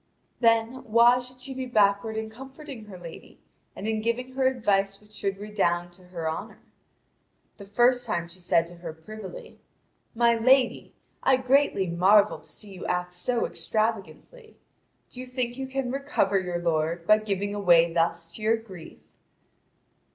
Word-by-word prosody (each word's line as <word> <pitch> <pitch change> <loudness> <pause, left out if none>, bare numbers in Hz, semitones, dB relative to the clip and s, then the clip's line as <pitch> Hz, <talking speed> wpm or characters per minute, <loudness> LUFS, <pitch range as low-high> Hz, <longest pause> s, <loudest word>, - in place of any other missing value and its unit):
Then, 230 +1 +2
why 235 +2 +5
should 250 0 -10
she 265 +1 -6
be 260 0 -5
backward 215 -1 +2
in 220 0 -3
comforting 265 0 -10
her 200 -3 -10
lady 170 -2 -12 0.4
and 205 - -5
in 220 -1 -1
giving 235 +3 -2
her 260 0 +1
advice 200 -6 +1
which 210 0 -23
should 195 -2 -3
redound 175 -4 -1
to 180 +1 -17
her 170 -3 -5
honour? 215 +7 -5 0.9
The 200 - -10
first 245 +4 +3
time 170 -5 -2
she 170 +2 -14
said 170 -1 +2
to 175 +1 -13
her 170 -2 -7
privily: 215 - -10 0.6
"My 235 0 +4
lady, 255 +3 +2 0.3
I 265 - +4
greatly 255 -5 +2
marvel 190 +4 +4
to - - -13
see 205 -2 -10
you 185 - -9
act 180 0 -2
so 235 +7 -1
extravagantly. 225 - -4 0.5
Do 250 - -10
you 255 - -7
think 250 -1 -3
you 265 0 -5
can 265 -2 -3
recover 270 -8 +1
your 180 -2 -3
lord 165 0 -1
by 215 +3 +6
giving 205 -1 -2
away 170 -4 +4
thus 165 0 0
to 215 - -10
your 220 +2 +2
grief?" 190 -7 -12
215 Hz, 165 wpm, -26 LUFS, 180-250 Hz, 0.9 s, by